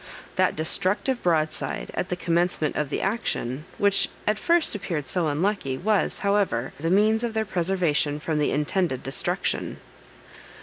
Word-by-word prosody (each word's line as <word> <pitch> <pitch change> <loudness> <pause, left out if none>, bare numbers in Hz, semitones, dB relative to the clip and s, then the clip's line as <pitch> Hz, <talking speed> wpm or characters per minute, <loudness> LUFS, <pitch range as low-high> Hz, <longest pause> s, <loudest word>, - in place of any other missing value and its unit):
That - - +2
destructive 195 - 0
broadside 155 -3 -1
at 180 - -2
the 180 - -1
commencement 170 -2 0
of 150 -2 -1
the - - -2
action, 155 - -2
which 200 -1 +3 0.2
at 210 0 +1
first 340 +4 +2
appeared 180 -8 -3
so 175 -3 0
unlucky, 150 -3 0
was, 210 +5 +1
however, 200 - +1
the 165 +3 -1
means 215 +4 +3
of 230 -2 -2
their 220 0 +1
preservation 170 -6 0
from 155 0 -1
the 150 - +2
intended 150 -1 0
destruction. 135 - -1
175 Hz, 145 wpm, -25 LUFS, 150-205 Hz, 0.2 s, which